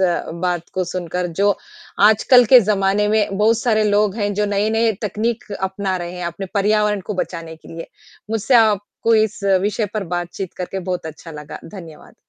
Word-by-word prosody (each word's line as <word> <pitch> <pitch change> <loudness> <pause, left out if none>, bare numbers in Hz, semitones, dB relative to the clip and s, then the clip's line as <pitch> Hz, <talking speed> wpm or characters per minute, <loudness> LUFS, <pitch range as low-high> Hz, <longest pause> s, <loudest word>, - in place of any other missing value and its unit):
अ, 175 -3 0
बात 175 -2 -1
को 185 -1 0
सुनकर 180 0 -3
जो 205 0 +4 0.6
आजकल 245 +3 +5
के 250 - +10
ज़माने 205 0 +1
में 210 -2 +1
बहुत 220 +2 +3
सारे 220 -3 +1
लोग 205 -1 +2
हैं, 205 -2 -1
जो 210 +1 0
नए-नए 220 +2 +2
तकनीक 215 +3 -2
अपना 190 0 -2
रहे 175 0 -5
हैं 180 - -5
अपने 170 +3 -5
पर्यावरण 210 0 +2
को - - -1
बचाने 165 -2 -8
के - - -17
लिए। 165 - -7 0.4
मुझसे 225 +4 +1
आपको 220 +1 +2
इस 215 - -6 0.2
विषय 210 +2 -1
पर 210 - -2
बातचीत 175 +1 -5
करके 185 +1 -4
बहुत 180 -3 -3
अच्छा 160 +1 -10
लगा, 150 -1 -9
धन्यवाद। 165 -5 -12
200 Hz, 175 wpm, -20 LUFS, 180-215 Hz, 0.6 s, के